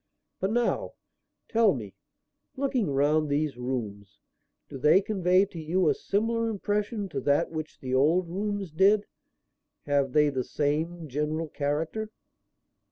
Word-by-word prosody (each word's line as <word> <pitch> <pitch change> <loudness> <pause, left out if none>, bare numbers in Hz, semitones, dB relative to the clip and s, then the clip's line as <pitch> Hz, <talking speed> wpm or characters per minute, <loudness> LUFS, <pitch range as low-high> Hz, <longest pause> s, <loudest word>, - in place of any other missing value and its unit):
But 190 - 0
now, 240 +1 0 0.5
tell 225 -6 +3
me; 105 -6 -7 0.6
looking 260 - 0
round 145 +2 +2
these 145 -1 0
rooms, 110 -6 -5 0.5
do 135 - -8
they 150 +7 +6
convey 190 -2 +2
to 180 -4 -9
you 165 +2 +1
a - - +4
similar 230 +3 -1
impression 210 0 -2
to - - -3
that 145 +4 +2
which 155 -1 -6
the 130 -1 -4
old 160 +7 +3
rooms 200 0 -3
did? 200 +6 +4 0.8
Have 140 -2 +1
they 150 -1 +4
the 130 -3 -2
same 160 +5 -2
general 150 +3 -2
character?" 155 +10 -2
160 Hz, 135 wpm, -27 LUFS, 145-200 Hz, 0.8 s, they